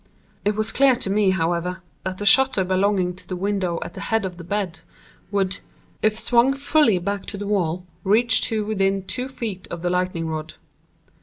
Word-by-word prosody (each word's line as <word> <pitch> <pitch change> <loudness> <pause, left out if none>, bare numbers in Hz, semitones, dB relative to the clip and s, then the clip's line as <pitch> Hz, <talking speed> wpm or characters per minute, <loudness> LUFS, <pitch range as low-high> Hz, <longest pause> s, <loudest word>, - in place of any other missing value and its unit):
It 210 0 +1
was 215 +1 0
clear 270 -1 +4
to 215 -5 0
me, 205 -1 +3
however, 180 +1 -1 0.2
that 185 0 -4
the 205 - -4
shutter 255 -2 +5
belonging 185 0 +1
to - - -14
the 185 - -4
window 190 -2 -1
at - - -9
the - - -8
head 225 -2 0
of 180 -2 -6
the 170 - -9
bed, 190 -1 -3 0.5
would, 195 -1 -1 0.4
if 215 0 +2
swung 240 +4 +3
fully 280 -6 +3
back 200 +3 -3
to 205 - -4
the 205 - -5
wall, 180 -4 -1 0.2
reach 225 +4 +5
to 215 -2 -1
within 195 -2 0
two 250 +6 -3
feet 225 -8 -6
of 170 0 -6
the 175 - 0
lightning 180 -2 -1
rod. 155 0 -5
195 Hz, 190 wpm, -22 LUFS, 180-215 Hz, 0.5 s, shutter